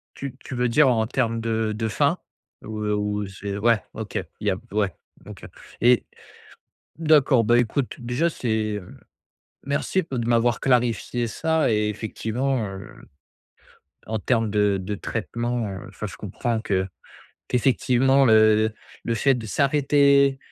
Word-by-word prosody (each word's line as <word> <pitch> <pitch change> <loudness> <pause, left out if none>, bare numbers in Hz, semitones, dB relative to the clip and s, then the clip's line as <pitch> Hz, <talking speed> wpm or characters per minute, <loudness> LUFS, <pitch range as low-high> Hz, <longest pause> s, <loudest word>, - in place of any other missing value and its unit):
Tu 135 -2 -6
tu 130 - -6
veux 125 0 +1
dire 145 +4 +5
en 110 -3 +1
termes 115 -2 -1
de 110 -1 -1
de 110 +1 -2
faim, 105 - +1 0.5
ou, 110 0 -6
heu, 105 0 0
ou, 105 0 -1
heu, - - -5
c'est 100 +1 -6
ouais, 110 0 +3
OK. - - -4 0.2
Il - - -4
y - - +5
a - - 0 0.2
ouais, 100 -3 0 0.3
OK. - - -10 0.4
Et, 120 0 +4 0.9
d'accord, 145 -6 +4
bah, 120 +3 +4
écoute 120 +2 0
déjà 120 +8 0
c'est, 110 -6 -2
heu, 90 -3 -11 0.7
merci 140 +7 0
b 165 - -14
de 120 -2 -2
m'avoir 120 0 +2
clarifié 120 -1 +1
ça 160 +7 0
et 105 -1 +1
effectivement, 115 +3 -2
heu, 95 0 -9 1.1
en 110 0 -2
termes 115 0 0
de 105 -1 +2
de 105 +3 -4
traitement, 120 +2 -3
heu, 95 -1 -7
enfin, - - -6
je - - -9
comprends 115 -2 -3
que 95 -3 -1 0.6
qu'effectivement 130 +2 +3
le 110 -1 +4 0.3
le 115 - 0
fait 135 +4 +3
de 115 - -6
s'arrêter, 140 +3 +3
115 Hz, 155 wpm, -24 LUFS, 105-130 Hz, 1.1 s, dire